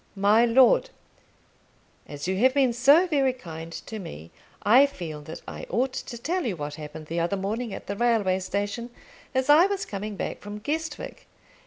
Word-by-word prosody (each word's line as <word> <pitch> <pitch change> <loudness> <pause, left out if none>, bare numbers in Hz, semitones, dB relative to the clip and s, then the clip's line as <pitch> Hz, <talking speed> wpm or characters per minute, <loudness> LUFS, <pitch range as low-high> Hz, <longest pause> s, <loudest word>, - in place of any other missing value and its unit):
MY 205 +4 +4
LORD, 265 - +5 1.2
As 145 +2 -6
you 190 - 0
have 260 +5 +3
been 265 -4 +3
so 280 +9 +5
very 275 -7 +1
kind 165 -8 -9
to 220 +5 -7
me, 80 - -9 0.3
I 250 +7 +6
feel 165 - -7
that 160 +2 -9
I - - -7
ought 255 +6 0
to 240 - -6
tell 350 +10 -2
you 225 -8 -2
what 145 -1 -5
happened 155 0 -8
the 165 +3 -3
other 175 +4 0
morning 215 +4 -3
at - - -7
the 200 - -4
railway 210 -5 +2
station, 205 +5 -3 0.5
as 260 0 +1
I 310 +5 +7
was 400 -1 -2
coming 205 +1 -5
back - - -4
from 205 0 -7
Guestwick. 315 +9 -5
215 Hz, 180 wpm, -26 LUFS, 185-260 Hz, 1.2 s, I